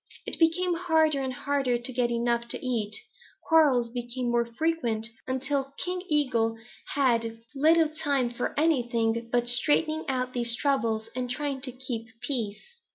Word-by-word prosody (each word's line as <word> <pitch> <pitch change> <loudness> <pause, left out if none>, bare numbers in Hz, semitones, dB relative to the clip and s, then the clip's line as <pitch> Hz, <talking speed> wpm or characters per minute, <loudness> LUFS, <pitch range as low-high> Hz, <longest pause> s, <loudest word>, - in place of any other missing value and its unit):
It - - -4
became 350 +2 +3
harder 320 -4 +2
and 265 -1 -2
harder 270 -1 0
to 245 +2 -6
get 245 -1 +1
enough 235 0 0
to 235 - -3
eat. 225 -5 -1 0.5
Quarrels 275 -8 +4
became 245 0 -3
more 235 0 +2
frequent, 280 -10 +1 0.2
until 275 +1 -2
King 360 0 -3
Eagle 235 -7 +1 0.4
had 230 -5 +2 0.2
little 315 +3 +4
time 285 -5 0
for 245 - -3
anything 235 -6 +1
but 240 0 +1
straightening 300 +6 +2
out 255 -1 -1
these 235 -1 +1
troubles 230 -5 0
and 250 -1 -2
trying 275 +1 -2
to 255 -1 -3
keep 245 -3 -5
peace. 245 - -4
255 Hz, 150 wpm, -27 LUFS, 235-295 Hz, 0.5 s, Quarrels